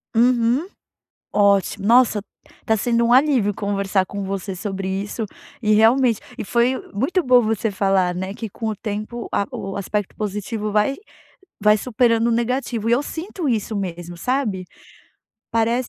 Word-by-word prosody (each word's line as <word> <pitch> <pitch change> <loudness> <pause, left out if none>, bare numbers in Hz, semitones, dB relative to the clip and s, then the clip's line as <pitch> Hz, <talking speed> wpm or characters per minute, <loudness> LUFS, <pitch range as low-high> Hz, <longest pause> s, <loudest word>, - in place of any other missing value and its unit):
Uhum, 245 +6 +3 0.7
ótimo. 200 0 +2
Nossa, 235 -3 +5 0.4
tá 220 0 +2
sendo 235 +2 +1
um 240 - +4
alívio 255 -7 +4
conversar 200 -1 0
com 200 +1 -5
você 195 0 -4
sobre 190 0 -4
isso, 200 +4 -3 0.4
e 215 -1 +3
realmente 230 +1 +4 0.2
e - - -3
foi 240 +4 +2 0.2
muito 305 - 0
bom 250 -1 +5
você 225 0 0
falar, 190 -2 +2
né, 190 +2 -4
que 225 +1 -6
com 225 +3 -5
o 215 - -1
tempo 215 +3 -5
a 200 - +1
o 195 0 -5
aspecto 200 0 -3
positivo 210 +1 -3
vai 210 +6 +2 0.7
vai 210 0 +5
superando 235 0 +2
o - - +2
negativo 235 -1 -1
e 235 - +5
eu 270 - +2
sinto 335 +1 -5
isso 220 -1 -1
mesmo 175 -3 -5
sabe? 215 -5 -1 0.9
Parece 230 +2 +1
215 Hz, 155 wpm, -21 LUFS, 200-240 Hz, 0.9 s, Nossa